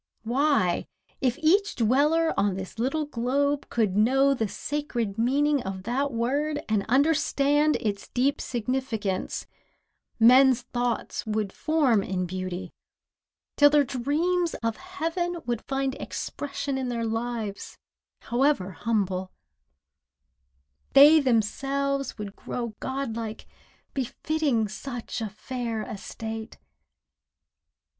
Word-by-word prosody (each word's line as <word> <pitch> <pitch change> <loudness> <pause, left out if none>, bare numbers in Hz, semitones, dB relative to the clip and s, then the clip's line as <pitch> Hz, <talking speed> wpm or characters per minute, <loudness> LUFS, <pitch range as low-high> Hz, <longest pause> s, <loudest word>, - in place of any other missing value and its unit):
Why, 245 - +1 0.3
if 255 -2 +1
each 395 +6 +3
dweller 290 +8 +3
on 200 -2 +1
this 190 +4 -7
little 275 +6 0
globe 280 +2 0
Could 215 -5 +1
know 270 +6 +4
the 225 -5 -1
sacred 230 -1 -3
meaning 280 +4 +2
of 190 -2 -5
that 265 +6 -1
word 285 +6 0
And 215 -2 +1
understand 290 +1 +3
its 205 -2 -3
deep 270 +3 0
significance, 235 -5 -2 0.7
Men's 255 +2 +6
thoughts 245 -1 -2
would 215 -2 -1
form 285 -9 +2
in 185 -1 -2
beauty, 185 0 -5 0.8
till 290 0 +8
their 295 0 +5
dreams 315 +7 0
Of 230 -1 -1
heaven 350 -1 -3
would 240 -1 -2
find 270 0 -1
expression 280 0 -4
in 260 - -2
their 235 -1 -2
lives, 225 -2 -4 0.4
However 240 -6 +1
humble; 190 -2 -1 1.6
they 295 +3 +9
themselves 275 +2 0
would 205 -2 -6
grow 235 -3 -5
Godlike, 230 -5 -4 0.5
befitting 270 -2 0
such 240 +3 -6
a 220 - -2
fair 230 +1 -4
estate. 220 +2 -7
245 Hz, 105 wpm, -26 LUFS, 220-285 Hz, 1.6 s, they